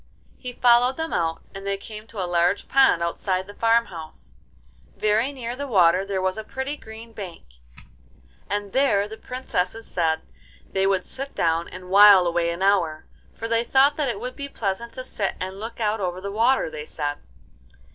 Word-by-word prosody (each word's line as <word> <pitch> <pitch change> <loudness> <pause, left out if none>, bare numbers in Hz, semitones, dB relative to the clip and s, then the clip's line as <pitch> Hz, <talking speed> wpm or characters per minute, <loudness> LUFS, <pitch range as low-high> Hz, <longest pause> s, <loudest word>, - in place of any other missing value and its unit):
He 250 - -5
followed 245 +1 +4
them 320 0 -3
out, 165 -1 -1
and 195 - -8
they 200 0 -1
came 215 +2 -10
to 225 - -9
a 185 - 0
large 175 +2 +1
pond 265 -10 +4
outside 185 +2 -1
the 205 - -11
farm 230 +2 +3
house. 155 - -9 0.6
Very 215 +5 +2
near 245 -3 -5
the 285 +2 -5
water 185 -5 +4
there 190 -2 -2
was 185 +3 0
a - - -5
pretty 265 +6 -4
green 225 -3 -12
bank, 190 -6 -8 1.1
and 205 -1 -3
there 235 -7 +3
the 220 - -8
Princesses 225 -3 -3
said 160 -2 0 0.4
they 195 0 0
would 190 -2 +1
sit 275 +1 -7
down 165 0 +1
and 185 0 -10
while 200 -2 +8
away 170 0 +1
an 170 +2 -3
hour, 170 -6 +2 0.3
for 225 - -5
they 230 0 +1
thought 270 +4 +4
that 295 -4 0
it 230 - -3
would 250 +3 -6
be 280 0 -6
pleasant 225 0 -3
to 255 - -6
sit 205 -6 -2
and 190 +1 -5
look 225 +3 -7
out 215 0 0
over 180 -2 -2
the 200 +1 -5
water, 235 +6 +2
they 150 -1 -7
said. 145 -1 -3
205 Hz, 190 wpm, -24 LUFS, 180-235 Hz, 1.1 s, while